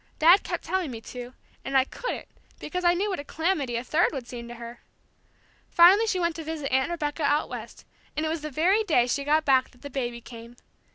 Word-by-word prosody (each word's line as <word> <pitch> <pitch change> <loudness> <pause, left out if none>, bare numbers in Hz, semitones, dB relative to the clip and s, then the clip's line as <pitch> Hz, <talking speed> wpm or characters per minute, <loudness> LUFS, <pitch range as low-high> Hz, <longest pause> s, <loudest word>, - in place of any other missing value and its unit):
Dad 345 +5 +6
kept - - -4
telling 370 -5 -1
me 235 -3 -6
to, 245 +2 -9 0.3
and 270 0 +1
I 260 - +5
couldn't, 485 - -5 0.3
because 360 +4 -4
I 345 0 +4
knew 400 +3 -1
what 375 - -3
a - - -5
calamity 310 -6 -1
a 235 - -2
third 315 +6 +2
would 260 -4 -5
seem 235 -1 -7
to 240 - -8
her! 235 0 -10 0.9
Finally 380 +6 +6
she 375 -4 0
went 340 -2 0
to 325 - -5
visit 310 -3 -4
Aunt 265 +3 +2
Rebecca 310 -2 -3
out 290 +1 +1
West, - - -8 0.3
and 310 - 0
it - - 0
was 320 -1 -2
the 305 - -5
very 360 +10 +2
day 300 - +3
she 275 +3 -1
got 305 +2 +2
back 260 -2 +3
that 250 - -23
the 285 - -7
baby 240 -3 -3
came. 235 0 -12
295 Hz, 230 wpm, -26 LUFS, 250-345 Hz, 0.9 s, Dad